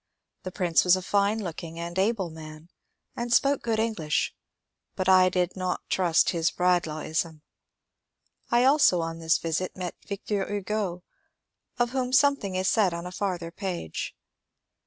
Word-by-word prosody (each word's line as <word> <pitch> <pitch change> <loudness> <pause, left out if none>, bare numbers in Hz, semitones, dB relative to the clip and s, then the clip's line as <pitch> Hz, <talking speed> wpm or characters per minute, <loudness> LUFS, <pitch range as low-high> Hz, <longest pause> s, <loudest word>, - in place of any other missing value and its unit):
The 185 - -6
Prince 175 -4 +2
was 180 0 +5
a 185 - -3
fine 200 +2 +2
looking 165 -1 -6
and 170 +2 -4
able 195 -4 0
man, 155 +1 -11 0.5
and 235 0 -4
spoke 275 +3 +3
good 225 -2 -1
English, 215 -9 0 0.6
but 185 -1 -2
I 185 -1 +6
did 180 -1 -1
not 185 -1 -3
trust 175 -3 +3
his 165 -2 +1
Bradlaughism. 160 -3 -1 1.1
I 240 +1 +4
also 265 - +5
on 165 0 -4
this 165 0 +2
visit 165 +4 -3
met 180 -1 -4
Victor 200 0 -3
Hugo, 200 -3 -2 0.7
of 240 -1 +1
whom 255 -1 -2
something 275 -9 +3
is 185 0 0
said 195 -6 +2
on 170 +1 -6
a 180 - -6
far 190 -1 -2
ther 170 -1 -8
page. 180 - -5
185 Hz, 155 wpm, -27 LUFS, 170-210 Hz, 1.1 s, I